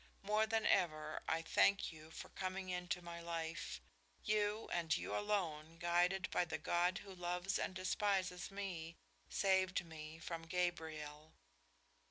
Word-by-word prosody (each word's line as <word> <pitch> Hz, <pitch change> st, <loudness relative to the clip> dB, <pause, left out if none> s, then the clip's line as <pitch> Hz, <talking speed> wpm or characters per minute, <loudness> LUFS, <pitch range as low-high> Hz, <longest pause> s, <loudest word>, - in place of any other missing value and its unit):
More 215 Hz, +2 st, +3 dB
than 225 Hz, 0 st, +1 dB
ever, 155 Hz, -5 st, +2 dB
I 165 Hz, +1 st, +1 dB
thank 200 Hz, 0 st, +4 dB
you 155 Hz, 0 st, -11 dB
for 165 Hz, -, -8 dB
coming 185 Hz, 0 st, -3 dB
into 180 Hz, 0 st, -2 dB
my 170 Hz, 0 st, -6 dB
life. 165 Hz, -, -3 dB, 0.4 s
You 210 Hz, +1 st, +1 dB
and 170 Hz, 0 st, +2 dB
you -, -, -3 dB
alone, 165 Hz, -6 st, -1 dB
guided 175 Hz, +2 st, +3 dB
by -, -, +3 dB
the 170 Hz, -, -2 dB
God 175 Hz, +3 st, +2 dB
who 195 Hz, 0 st, -8 dB
loves 180 Hz, +1 st, -1 dB
and 185 Hz, -, -1 dB
despises 185 Hz, -1 st, +1 dB
me, 180 Hz, -5 st, -4 dB, 0.3 s
saved 190 Hz, -2 st, +3 dB
me 155 Hz, -1 st, -8 dB
from 165 Hz, 0 st, -5 dB
Gabriel." 160 Hz, -3 st, -2 dB
175 Hz, 140 wpm, -39 LUFS, 165-190 Hz, 0.4 s, thank